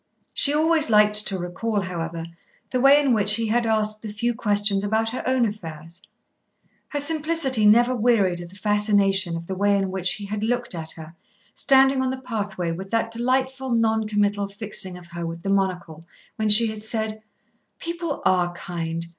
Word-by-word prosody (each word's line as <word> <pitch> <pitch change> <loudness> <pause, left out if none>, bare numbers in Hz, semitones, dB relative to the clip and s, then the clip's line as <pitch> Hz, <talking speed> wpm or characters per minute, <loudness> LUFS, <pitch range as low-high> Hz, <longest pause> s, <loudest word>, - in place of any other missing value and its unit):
She 285 - 0
always 310 -1 +4
liked 210 -1 +4
to 195 - -1
recall, 200 +5 -3
however, 170 -3 -5 0.5
the 255 - 0
way 275 +2 +6
in 275 -4 +2
which 210 -1 +4
he 230 +1 -1
had 235 +1 +1
asked 215 -1 0
the 215 - -7
few 235 +3 -1
questions 205 -3 +1
about 220 +2 0
her 255 - -4
own 255 -2 +2
affairs. 170 -4 -7 0.9
Her 290 - -4
simplicity 295 -6 +1
never 240 +4 +4
wearied 210 -7 +1
of 175 - -10
the 190 - -15
fascination 200 -3 +1
of 165 - -8
the 190 - -5
way 200 +1 +1
in 195 -1 -2
which 185 -1 +1
he 205 - -7
had 210 +1 -4
looked 245 0 -2
at 160 -2 -5
her, 160 0 -11 0.4
standing 270 0 +4
on 260 - 0
the 260 - -3
pathway, 205 -9 -4
with 190 +3 -7
that 225 +1 -1
delightful 260 +2 -1
non 220 -1 +1
committal 205 -1 0
fixing 200 -3 -4
of 180 - -13
her 170 0 -6
with 165 0 -6
the 195 - -1
monocle 180 -4 -2 0.3
when 215 -1 -1
she 215 +3 +8
had 215 -1 -8
said: 220 0 -3 0.6
"People 335 -3 -4
are 180 -1 +2
kind. 170 -2 -5
210 Hz, 185 wpm, -23 LUFS, 185-240 Hz, 0.9 s, she